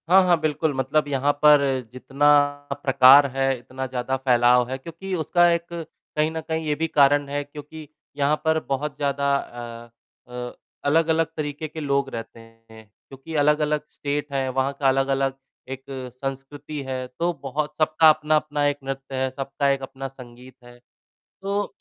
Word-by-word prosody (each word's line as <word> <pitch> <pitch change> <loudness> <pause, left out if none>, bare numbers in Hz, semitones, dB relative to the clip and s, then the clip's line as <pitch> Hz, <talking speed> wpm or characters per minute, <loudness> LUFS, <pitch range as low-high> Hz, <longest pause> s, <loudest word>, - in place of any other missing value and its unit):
हाँ, 190 +1 +7
हाँ। 175 -2 +3
बिल्कुल 155 0 0
मतलब 135 +3 0
यहाँ 140 0 +1
पर 150 -1 +8 0.3
जितना 135 +3 0 0.6
प्रकार 135 +1 +7
है, 135 -1 +1
इतना 130 +2 -6
ज़्यादा 130 +1 -2
फैलाव 125 -1 +3
है 130 - -3
क्योंकि 170 +7 -8
उसका 175 +1 +3
एक 170 0 0
कहीं 155 -1 -4
न 160 0 -4
कहीं 160 0 -2
ये 150 - +1
भी 165 +2 -1
कारण 145 -1 +3
है 145 0 -2
क्योंकि 150 +2 -11 0.3
यहाँ 145 +1 +2
पर 160 0 +3
बहुत 140 +2 -2
ज़्यादा 140 -1 0
अ 120 -3 -7 0.4
अ, 125 0 -6 0.3
अलग-अलग 160 +2 +3
तरीके 150 +1 -4
के 155 +1 -9
लोग 140 -2 0
रहते 115 0 -7
हैं 115 -1 -17 0.2
क्योंकि 135 +4 -9
अलग-अलग 150 0 +2
स्टेट 145 0 -4
हैं, 135 -1 0
वहाँ 130 +2 0
का 140 - +2
अलग-अलग 135 0 +1 0.4
एक 135 0 -6 0.3
संस्कृति 135 +3 -6
है, 130 -1 -4
तो 170 +8 -2
बहुत 150 +3 -3
सबका 155 0 +5
अपना-अपना 155 -1 +1
एक 145 0 0
नृत्य 135 0 -6
है, 130 0 0
सबका 140 +1 -2
एक 135 0 +1
अपना 135 0 -6
संगीत 125 -1 -14
है। 120 0 -15 0.6
तो 200 +1 -2
140 Hz, 160 wpm, -23 LUFS, 130-150 Hz, 0.6 s, पर